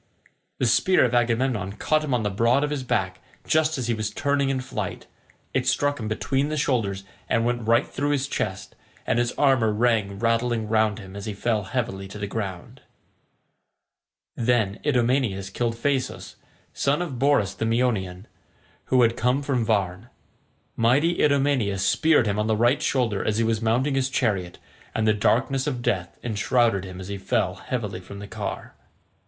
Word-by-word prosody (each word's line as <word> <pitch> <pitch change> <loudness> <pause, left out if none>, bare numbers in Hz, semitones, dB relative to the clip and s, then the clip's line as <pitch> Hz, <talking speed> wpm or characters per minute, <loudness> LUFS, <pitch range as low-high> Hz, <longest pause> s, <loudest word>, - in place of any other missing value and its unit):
The - - 0
spear 155 +8 +4
of 125 - -1
Agamemnon 120 -4 +1
caught 155 +7 0
him 150 - -3
on 120 -3 +1
the 105 - -1
broad 115 +7 +2
of 150 - -1
his 145 -2 -2
back, 95 -7 -1 0.3
just 155 -1 +2
as 130 - -2
he 120 - 0
was 110 -1 -2
turning 140 +4 0
in 135 -1 0
flight; 130 +1 -5 0.5
it - - 0
struck 145 -1 +1
him 110 - -4
between 135 +6 -1
the 155 - -2
shoulders 105 -9 0 0.3
and 115 0 +2
went 120 -2 -1
right 115 +1 +4
through 145 +2 -2
his 140 -1 0
chest, 95 -8 -4 0.3
and 115 - +1
his 120 0 +1
armour 130 -6 +3
rang 105 -3 +1
rattling 115 0 0
round 110 -1 +2
him 95 -3 -10
as 100 +1 -6
he 105 - -4
fell 110 -1 -1
heavily 95 -4 -3
to 95 - -9
the 100 - -3
ground. 100 -4 -6 1.5
Then 115 -4 +1
Idomeneus 120 -8 +1
killed 115 +2 -1
Phaesus, 130 +2 -2 0.4
son 145 +5 +1
of 135 -8 -6
Borus 135 -8 +2
the 115 - -3
Meonian, 110 -6 0 0.6
who 130 -1 +4
had 115 0 +3
come 125 +5 +1
from 130 -4 0
Varne. 100 -5 -1 0.7
Mighty 140 +9 +2
Idomeneus 135 -9 +2
speared 160 -6 +3
him 105 0 0
on 105 - 0
the 110 -1 +1
right 120 +5 +3
shoulder 120 -7 0
as 110 - 0
he 115 - +2
was 115 -1 0
mounting 120 +5 +1
his 135 -1 +1
chariot, 100 -9 -1 0.4
and 110 0 +1
the 110 - +5
darkness 130 +6 +1
of 125 -4 -3
death 90 -5 -1
enshrouded 110 -2 +1
him 95 -1 -9
as 95 - -7
he 100 -1 -4
fell 95 -1 0
heavily 105 0 -4
from 100 +2 -11
the 100 - -7
car. - - -6
115 Hz, 180 wpm, -24 LUFS, 105-130 Hz, 1.5 s, the